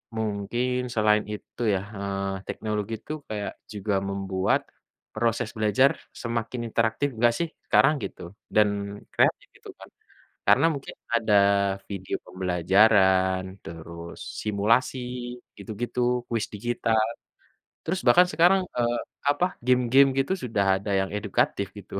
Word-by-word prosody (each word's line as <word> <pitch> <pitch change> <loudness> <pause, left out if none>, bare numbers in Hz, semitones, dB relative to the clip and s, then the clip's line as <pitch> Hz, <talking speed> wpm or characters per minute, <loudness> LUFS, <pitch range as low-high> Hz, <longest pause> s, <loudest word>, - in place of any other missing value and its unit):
mungkin 120 +4 -1
selain 105 -1 +3
itu 105 +3 -8
ya, 95 - -1 0.2
eee, 100 0 -3
teknologi 105 0 -3
tuh 155 +1 -3
kayak 105 -1 -4 0.2
juga 100 0 -1
membuat 95 -1 0 0.5
proses 115 0 0
belajar 110 +6 +4 0.2
semakin 115 +1 -3
interaktif 115 +5 +1
enggak 120 +1 +3
sih? 170 -1 -1 0.2
Sekarang 135 +3 +5
gitu - - -6 0.3
dan 105 -1 +5 0.4
kreatif - - +2
itu - - -12
kan - - -12 0.6
karena 140 +6 +6
mungkin 140 - -7 0.2
ada 115 -3 +2 0.5
video 95 -2 -4
pembelajaran 95 +1 +3 0.2
terus 85 +1 -9 0.2
simulasi 110 +5 +1 0.6
gitu-gitu, 120 +3 -5 0.3
kuis 115 -2 -1
digital, 115 +1 0 0.8
terus 185 +3 -2
bahkan 180 +1 +7
sekarang, 180 +3 +4 0.2
eee, 120 0 +1 0.3
apa 145 +5 +2 0.2
game-game 125 +2 +5
gitu 135 +7 +1
sudah 105 -5 0
ada 100 +1 -5
yang 95 - -2
edukatif 100 -1 -1
gitu. 100 - -11
110 Hz, 120 wpm, -26 LUFS, 100-120 Hz, 0.8 s, bahkan